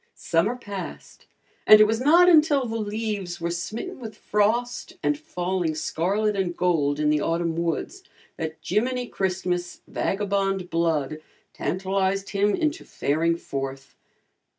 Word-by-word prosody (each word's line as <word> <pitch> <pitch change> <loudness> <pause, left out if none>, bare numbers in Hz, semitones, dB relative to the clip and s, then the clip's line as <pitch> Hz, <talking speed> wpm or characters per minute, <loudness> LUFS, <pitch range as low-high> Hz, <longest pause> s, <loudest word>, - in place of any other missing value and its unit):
Summer 180 +8 +1
passed, 200 -6 -8 0.4
and 215 0 +10
it 215 - +8
was 225 +2 0
not 335 +6 +6
until 305 -5 +5
the 225 -1 -4
leaves 205 -4 -3
were 170 0 -2
smitten 220 - -5
with 225 -3 -8
frost 225 +4 0
and 145 0 +2
falling 175 +2 -2
scarlet 195 +7 0
and 185 -3 -2
gold 150 -5 +1
in 150 0 +2
the 150 -1 +2
autumn 165 0 0
woods 170 - -2 0.3
that 160 0 -4
Jiminy 250 +3 0
Christmas' 180 -4 -2
vagabond 195 -2 -1
blood 155 -3 0 0.3
tantalized 195 +1 -1
him 205 0 +2
into 310 0 -1
faring 165 +4 0
forth. 135 -3 -6
190 Hz, 130 wpm, -25 LUFS, 165-215 Hz, 0.4 s, and